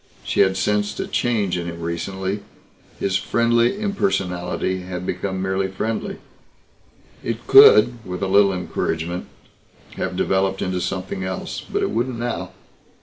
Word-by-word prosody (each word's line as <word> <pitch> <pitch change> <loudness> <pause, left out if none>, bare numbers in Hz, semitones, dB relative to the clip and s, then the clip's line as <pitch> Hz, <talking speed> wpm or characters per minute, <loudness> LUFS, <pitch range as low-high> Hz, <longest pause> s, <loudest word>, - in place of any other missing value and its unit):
She - - -2
had 95 0 +4
sensed 105 +2 0
a - - -1
change 105 -7 0
in 85 - -4
him 85 0 -6
recently. 95 +4 -3 0.6
His 95 -1 +1
friendly 120 - +2
impersonality 95 - -1
had 90 0 -6
become 95 +1 -3
merely 95 0 0
friendly. 115 - -3 1.1
It - - -4
could, 405 - +7
with 90 -1 -5
a - - +1
little 100 +1 +5
encouragement, 85 -1 -3 0.7
have - - -2
developed 95 0 +1
into 90 -1 -1
something 95 +1 -3
else. 95 0 -4
But - - -2
it - - 0
wouldn't 120 +1 -1
now. 120 0 -3
95 Hz, 140 wpm, -22 LUFS, 90-115 Hz, 1.1 s, could